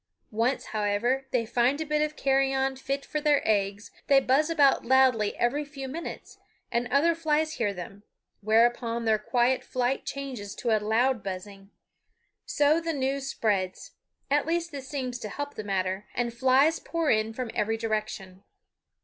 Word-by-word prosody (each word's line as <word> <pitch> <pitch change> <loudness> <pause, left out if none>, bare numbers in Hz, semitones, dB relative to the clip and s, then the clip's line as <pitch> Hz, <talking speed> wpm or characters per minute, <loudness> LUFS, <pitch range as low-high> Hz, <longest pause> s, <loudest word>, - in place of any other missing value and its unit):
Once, 230 +5 0
however, 220 +6 0
they 245 -3 0
find 245 +5 +1
a 315 - -2
bit 300 0 0
of 305 0 -1
carrion 270 -1 +1
fit 275 +1 -4
for 300 - -3
their 295 -2 +3
eggs, 205 -1 0 0.2
they 275 -2 +6
buzz 270 +4 +2
about 290 -5 +4
loudly 250 -5 +3
every 275 +5 +1
few 280 -2 -8
minutes, 320 +6 -7 0.3
and 240 +1 0
other 280 +7 +3
flies 315 -1 0
hear 220 -9 0
them; 195 +1 -9 0.4
whereupon 230 +2 +2
their 220 -1 +3
quiet 245 +3 +1
flight 255 +1 -1
changes 255 -8 -6
to 230 -3 +1
a 215 - 0
loud 230 +3 +2
buzzing. 195 +1 -7 0.8
So 295 +3 +3
the 330 0 -2
news 270 0 -2
spreads 195 -8 -1 0.4
at 290 +1 +2
least 340 0 -1
this 275 -2 -7
seems 255 -4 -3
to 215 - -6
help 285 +6 -5
the 215 - -6
matter 190 0 -2
and 240 -1 -1
flies 265 +6 +3
pour 330 -3 -1
in 215 0 +1
from 240 0 -5
every 225 +2 0
direction. 215 -4 -4
250 Hz, 165 wpm, -27 LUFS, 215-280 Hz, 0.8 s, they